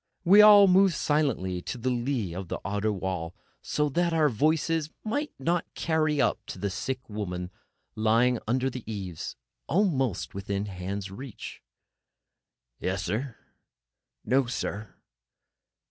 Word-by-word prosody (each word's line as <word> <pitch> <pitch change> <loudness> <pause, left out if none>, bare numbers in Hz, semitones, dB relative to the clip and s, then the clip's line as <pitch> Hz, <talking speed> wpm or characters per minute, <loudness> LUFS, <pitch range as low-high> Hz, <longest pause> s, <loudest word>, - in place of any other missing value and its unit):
We 195 +4 +8
all 205 -1 +9
moved 190 -1 +5
silently 135 -14 0
to 125 - -5
the 130 +2 -1
lee 120 -6 -1
of 95 +1 -6
the - - -3
outer 105 +2 0
wall, 90 -3 -4 0.3
so 150 0 0
that 170 +4 +1
our 155 -2 +4
voices 155 +5 +1
might 285 +8 -2
not 170 +5 -1
carry 155 -2 +1
up - - +1
to - - -7
the 100 -1 -2
sick 130 +6 -4
woman 90 -4 -4 0.4
lying 115 +3 +3
there 120 - -4
under 130 +3 +1
the 125 -1 -7
eaves, 95 -6 -5 0.3
almost 135 - 0
within 100 +1 -3
hand 95 0 -5
reach. 125 +2 -9 1.2
"Yes, 95 0 -2
sir." 115 +8 -3 0.9
"No, 130 0 +2
sir." 105 -3 -4
125 Hz, 135 wpm, -27 LUFS, 100-155 Hz, 1.2 s, all